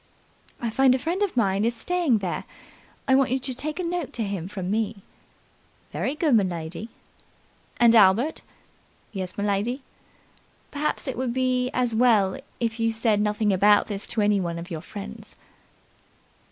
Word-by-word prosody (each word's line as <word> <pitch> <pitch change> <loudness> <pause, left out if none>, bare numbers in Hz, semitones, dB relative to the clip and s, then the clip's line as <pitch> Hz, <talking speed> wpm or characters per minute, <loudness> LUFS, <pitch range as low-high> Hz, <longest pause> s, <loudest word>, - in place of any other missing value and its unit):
"I 235 -2 -2
find 265 +1 +4
a - - +1
friend 335 +9 -2
of 400 -10 0
mine 200 -3 +2
is 235 +1 +1
staying 335 -1 +1
there. 175 - -3 0.6
I 265 - +4
want 270 -1 +4
you 260 - +1
to 260 0 -2
take 305 +6 -4
a - - -1
note 345 -3 -3
to 230 - -1
him 195 -4 -4
from 190 -2 -4
me." 210 -2 -2 0.9
"Very 275 - -2
good, 305 -3 +1
m'lady." 180 -1 0 0.9
"And, 235 -1 +6
Albert 225 +7 +4 0.4
" - - -35 0.3
"Yes, 190 -4 -4
m'lady?" 205 +6 -1 0.9
"Perhaps 300 0 -2
it 260 - -3
would 255 -2 -2
be 255 -1 +1
as 245 -2 0
well 220 -5 +3 0.2
if 230 -1 -2
you 225 0 +2
said 220 -2 +1
nothing 210 0 +1
about 205 +2 +5
this 200 -1 -3
to 220 - -1
any 205 -1 +3
of 170 0 -4
your 160 -2 -4
friends." 200 +3 -6
225 Hz, 165 wpm, -25 LUFS, 200-260 Hz, 0.9 s, And